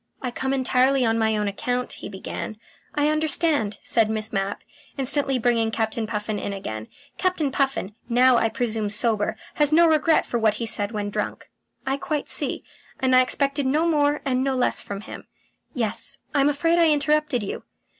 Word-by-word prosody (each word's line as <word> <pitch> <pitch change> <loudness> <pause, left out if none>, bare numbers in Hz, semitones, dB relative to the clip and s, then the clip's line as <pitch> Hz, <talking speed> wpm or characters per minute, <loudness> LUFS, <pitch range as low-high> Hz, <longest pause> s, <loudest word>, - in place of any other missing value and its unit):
"I 250 - -4
come 265 +2 -2
entirely 260 0 +2
on 225 0 +1
my 220 -1 +2
own 210 -1 -1
account," 245 +5 -2
he - - -8
began. 195 +2 -6 0.4
"I 295 0 +2
understand," 305 -8 +2
said 225 -2 +2
Miss 215 0 -2
Mapp, 195 0 -2 0.3
instantly 275 0 +1
bringing 230 -2 +1
Captain 220 0 -2
Puffin 210 -1 -3
in 200 - -4
again. 110 - -6 0.3
"Captain 360 -7 0
Puffin, 270 -7 -1 0.2
now 250 +2 +5
I 225 - +2
presume 220 -2 -2
sober, 215 0 +1 0.2
has 295 -1 +4
no 335 +2 +6
regret 320 0 +3
for 240 - -2
what 215 -2 +2
he 230 - -3
said 205 -1 -1
when 205 -2 -3
drunk. - - -4 0.3
I 270 +1 0
quite 295 +1 -3
see, - - -1 0.4
and 260 -2 +3
I 255 - +8
expected 275 +2 0
no 305 +5 +2
more 295 -3 +2
and 260 -1 +1
no 270 -1 0
less 255 - +1
from 200 0 -6
him. - - -10 0.5
Yes. 225 -5 -1 0.2
I 285 - +3
am 280 - +4
afraid 330 +4 +1
I 335 -1 +5
interrupted 300 -4 +1
you." 195 - -5
250 Hz, 185 wpm, -24 LUFS, 220-290 Hz, 0.5 s, I